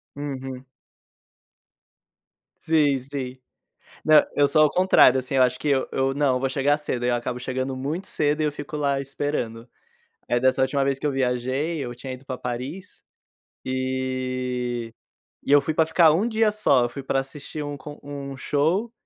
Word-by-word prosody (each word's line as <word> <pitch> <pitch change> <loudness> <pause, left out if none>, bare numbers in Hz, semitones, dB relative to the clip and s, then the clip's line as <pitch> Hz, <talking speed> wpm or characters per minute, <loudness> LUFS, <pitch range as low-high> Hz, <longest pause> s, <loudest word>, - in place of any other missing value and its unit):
Uhum. 135 -2 -6 2.0
Sim, 150 -4 +3
sim. 130 -1 -6 0.7
Não, 155 -1 +8
eu 145 0 +4
sou 155 +2 +4
o - - -4
contrário, 180 -8 +5
assim, 130 +1 -4
eu 130 - +4
acho 125 0 +1
que 150 - -4
eu 135 -2 +2
eu: 135 0 0
"Não, 140 -2 +2
eu - - 0
vou 135 - 0
chegar 145 +2 +2
cedo", 130 -5 -3
e - - +1
aí - - +2
eu 120 - +2
acabo 120 +1 -3
chegando 130 +1 -3
muito 150 +9 -3
cedo, 150 0 0
e - - +2
eu 150 - +1
fico 145 +1 -7
lá 140 -2 0
esperando. 130 -4 -4 0.6
Aí 120 - +1
dessa 130 +1 +2
última 135 +1 +1
vez 135 -1 0
que 145 - -6
eu 145 - +2
viajei, 130 +5 -1
eu 120 - -6
tinha 130 +2 -7
ido 130 +2 -11
pra 130 -1 -4
Paris 125 +10 -6 0.6
e 130 -2 -2 0.5
e - - +1
eu 145 - +8
fui 150 +3 -2
pra 160 +1 +2
ficar 165 0 +5
um 195 +8 +1
dia 220 -1 +2
só, 140 -12 +3
eu - - -5
fui 140 - -7
pra 135 0 0
assistir 145 +2 -7
um 145 0 -5
con 145 +2 -10
um 140 -1 -7
show, 165 - 0
135 Hz, 190 wpm, -24 LUFS, 130-150 Hz, 2.0 s, Não